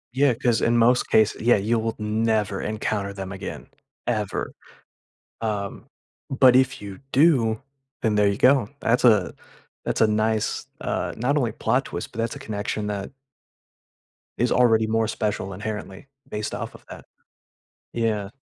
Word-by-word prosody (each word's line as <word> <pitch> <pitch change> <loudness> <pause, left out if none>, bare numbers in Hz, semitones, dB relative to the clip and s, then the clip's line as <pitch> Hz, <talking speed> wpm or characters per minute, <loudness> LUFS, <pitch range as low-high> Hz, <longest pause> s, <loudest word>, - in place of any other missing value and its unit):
Yeah, 135 -1 +4
'cause 120 0 +1
in 120 +1 +3
most 120 +2 +3
case 110 -1 +4
Yeah, 120 +2 +5
you 115 +4 +1
will 115 0 -2
never 105 -2 0
encounter 105 -2 -2
them 95 -1 -6
again. 95 -1 -7 0.4
Ever. 105 -4 -2 0.9
Um, 105 -3 -3 0.4
but 130 -1 +6
if 130 -3 +2
you 100 -2 -8
do, 125 -7 +4 0.4
then 110 -2 +1
there 105 - +4
you 100 - 0
go. 125 -2 +4
That's 120 +3 +1
a 105 -6 +4 0.5
that's - - -2
a 110 - +6
nice 110 0 0
uh, - - -2
not 130 +6 0
only 120 -7 +1
plot 130 +3 0
twist, - - -6
but 120 - -10
that's 115 0 -1
a - - -6
connection 105 -3 -3
that 100 +2 -4 1.3
is 120 - +1
already 115 -3 +4
more 110 0 +1
special 105 -3 -2
inherently 105 +3 -6 0.2
based 105 0 -3
off - - -6
of - - -16
that. - - -10 0.9
Yeah. 110 -4 -1
110 Hz, 155 wpm, -24 LUFS, 105-120 Hz, 1.3 s, but